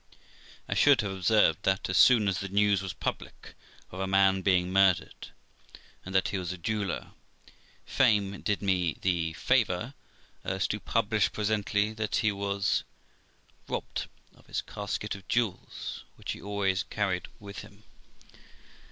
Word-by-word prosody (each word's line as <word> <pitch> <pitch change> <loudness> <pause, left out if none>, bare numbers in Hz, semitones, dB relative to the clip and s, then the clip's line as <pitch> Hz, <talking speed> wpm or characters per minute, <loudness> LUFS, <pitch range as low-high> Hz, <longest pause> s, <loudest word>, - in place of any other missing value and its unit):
I - - -1
should 145 -3 +5
have 100 -2 -3
observed 95 -3 +3
that, 95 0 0
as 95 - -2
soon 110 0 +6
as 95 -2 0
the 100 - -5
news 100 0 +3
was 95 -2 -4
public - - -6 0.4
of 95 - -8
a 95 - -1
man 95 0 +3
being 90 -1 +2
murdered, 95 -2 +2 0.8
and 95 +1 -7
that 95 +3 +3
he 100 -1 -2
was 90 -1 -4
a 95 - -6
jeweller, 100 +1 -3 0.7
fame 100 -6 +2
did 105 -1 -1
me 90 -5 +1
the 85 -3 0
favour 115 - +1 0.5
as 95 0 -1
to 105 - -2
publish 110 -1 +1
presently 105 0 0
that 110 -1 -2
he 110 - +2
was 100 0 0 0.8
robbed - - -4 0.3
of - - -23
his - - -3
casket 105 +1 -4
of 100 -1 -10
jewels, 115 -5 -2
which - - -5
he - - -7
always 100 -2 0
carried 100 -4 -2
about 100 -1 -10
him. 100 +2 -11
100 Hz, 150 wpm, -29 LUFS, 95-105 Hz, 0.8 s, soon